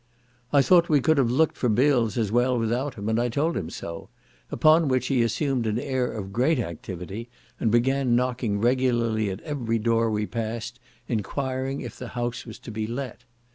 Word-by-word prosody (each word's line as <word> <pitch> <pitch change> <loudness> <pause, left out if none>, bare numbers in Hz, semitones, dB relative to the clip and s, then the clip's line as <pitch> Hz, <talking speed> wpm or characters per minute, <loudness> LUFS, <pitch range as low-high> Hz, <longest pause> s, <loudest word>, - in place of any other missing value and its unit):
I 140 -2 +5
thought 175 0 +5
we 150 -2 +5
could 155 +2 +3
have 125 -4 +3
looked 150 +6 +2
for 125 - 0
bills 120 -2 +2
as 110 -4 0
well 125 +2 +2
without 120 +4 -1
him, 100 0 -6
and 110 +1 +1
I 120 - 0
told 155 +8 0
him 80 - -3
so; 85 -1 -7 0.4
upon 155 +1 +4
which 130 -2 +1
he 130 -3 +3
assumed 120 +1 0
an 110 +1 0
air 130 -1 -1
of 100 -3 -6
great 135 +8 +2
activity, 95 +2 -6 0.3
and 115 - +1
began 125 +2 +2
knocking 120 -4 0
regularly 120 -3 +1
at 95 - -5
every 125 -7 -2
door 115 0 +2
we 105 -1 0
passed, 115 +2 -4 0.3
enquiring 130 +4 -2
if - - -8
the 125 - -6
house 120 0 -3
was 110 - -8
to - - -8
be 110 0 -3
let. 125 0 -6
120 Hz, 190 wpm, -25 LUFS, 110-130 Hz, 0.4 s, I